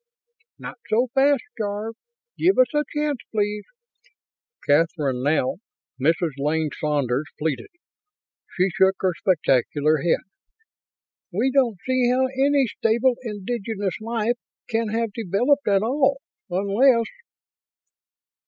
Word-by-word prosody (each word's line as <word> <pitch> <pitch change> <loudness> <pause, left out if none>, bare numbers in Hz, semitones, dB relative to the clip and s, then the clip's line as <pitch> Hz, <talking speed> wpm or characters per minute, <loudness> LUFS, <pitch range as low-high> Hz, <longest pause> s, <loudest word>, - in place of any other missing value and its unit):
"Not - - -9
so 240 +3 +2
fast, 275 -1 +3 0.2
Jarve; 210 +1 -3 0.4
give 370 +3 +2
us 255 +3 +4
a 295 0 +2
chance, 295 -3 -1
please!" 210 -1 -1 1.0
Kathryn, 145 -4 +2
now 145 -1 +1 0.4
Mrs. 165 +3 +2
Lane 150 +1 0
Saunders, 145 -2 0
pleaded. 150 -3 -2 0.9
She 185 +1 +2
shook 190 +2 +3
her 185 -2 +1
spectacular 155 -3 +1
head. 165 +3 +1 1.1
"We 230 +9 +1
don't 250 -6 +2
see 255 -1 +2
how 255 +1 +3
any 270 +1 +2
stable 235 +3 +1
indigenous 210 -2 -4
life 230 +1 -1 0.3
can 225 0 0
have 225 0 -2
developed 235 +8 +1
at 200 -1 +3
all, 275 +3 +2 0.3
unless 220 +7 +3
210 Hz, 110 wpm, -23 LUFS, 170-255 Hz, 1.1 s, us